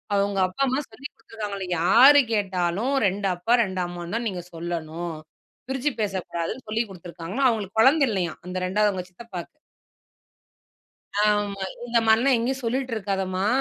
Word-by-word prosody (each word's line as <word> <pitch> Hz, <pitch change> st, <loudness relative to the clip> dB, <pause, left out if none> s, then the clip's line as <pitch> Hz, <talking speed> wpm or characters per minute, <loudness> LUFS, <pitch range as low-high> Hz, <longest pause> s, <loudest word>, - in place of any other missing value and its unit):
அவங்க 200 Hz, 0 st, +1 dB
அப்பா 185 Hz, +8 st, -7 dB
அம்மா 260 Hz, +2 st, +1 dB
சொல்லிக் 275 Hz, +3 st, -10 dB
கொடுத்திருக்காங்களா 210 Hz, -4 st, -6 dB, 0.2 s
யாரு 255 Hz, +11 st, +8 dB
கேட்டாலும் 195 Hz, +4 st, 0 dB
2 195 Hz, +1 st, -1 dB
அப்பா, 180 Hz, +7 st, 0 dB
2 190 Hz, -3 st, -4 dB
அம்மான்னு 175 Hz, +2 st, -6 dB
தான் 235 Hz, 0 st, -1 dB
நீங்க 180 Hz, -3 st, -5 dB
சொல்லணும். 165 Hz, 0 st, -4 dB, 0.5 s
பிரிச்சு 265 Hz, +2 st, 0 dB
பேசக்கூடாதுன்னு 190 Hz, +2 st, -3 dB
சொல்லி 220 Hz, +2 st, +1 dB
கொடுத்திருக்காங்களாம். 180 Hz, +7 st, -2 dB
அவங்களுக்கு 220 Hz, -2 st, -2 dB
குழந்த 280 Hz, +5 st, +5 dB
இல்லையாம். 180 Hz, -5 st, -2 dB
அந்த 180 Hz, 0 st, -6 dB
இரண்டாவது 205 Hz, +3 st, +2 dB
அவங்க 185 Hz, -2 st, -5 dB
சித்தப்பாக்கு. 185 Hz, -, -9 dB, 1.6 s
ஆமா, 205 Hz, -1 st, +1 dB, 0.2 s
இந்த 240 Hz, -1 st, +2 dB
மாரிலாம் 235 Hz, +4 st, +5 dB
எங்கயும் 260 Hz, +3 st, -2 dB
சொல்லீட்டு 255 Hz, +2 st, -1 dB
இருக்காதம்மா. 190 Hz, -2 st, -1 dB
200 Hz, 135 wpm, -25 LUFS, 180-235 Hz, 1.6 s, யாரு